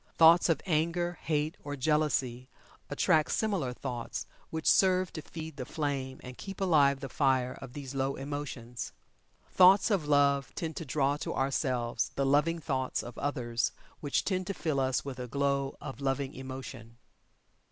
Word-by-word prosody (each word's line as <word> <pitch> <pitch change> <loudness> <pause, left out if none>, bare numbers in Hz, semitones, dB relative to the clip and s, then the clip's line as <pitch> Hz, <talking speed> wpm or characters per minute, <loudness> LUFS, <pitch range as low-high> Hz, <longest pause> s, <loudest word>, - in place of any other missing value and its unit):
Thoughts 165 +2 +7
of 160 -3 +1
Anger, 175 +1 0
Hate, 155 0 -1
or 145 0 -4
Jealousy 135 -4 0 0.4
attract 155 -1 +2
similar 195 - 0
thoughts 125 -2 -5 0.2
which 160 -1 -4
serve 185 -1 +4
to 155 - -5
feed 160 0 -8
the 130 - -3
flame 135 -3 -3
and 125 0 -9
keep 195 +1 -7
alive 145 -7 +4
the 135 - -4
fire 130 -1 +1
of 135 -2 -9
these 140 -2 -7
low 135 0 -1
emotions. 135 -4 -5 0.6
Thoughts 190 +4 +6
of 180 -7 +1
Love 140 -1 +3
tend 160 -2 -3
to 165 - -4
draw 140 +1 +1
to - - -4
ourselves 130 -3 0
the 140 - +1
loving 150 +5 +3
thoughts 135 -5 -2
of 120 0 -8
others 120 -5 -1 0.3
which 145 -2 0
tend 185 -2 -1
to 200 - -3
fill 155 -5 -1
us 130 0 0
with 135 -2 -6
a 125 - -4
glow 140 +1 0
of 135 +1 -8
loving 135 0 -1
emotion. 130 -3 -8
140 Hz, 165 wpm, -30 LUFS, 130-160 Hz, 0.6 s, Thoughts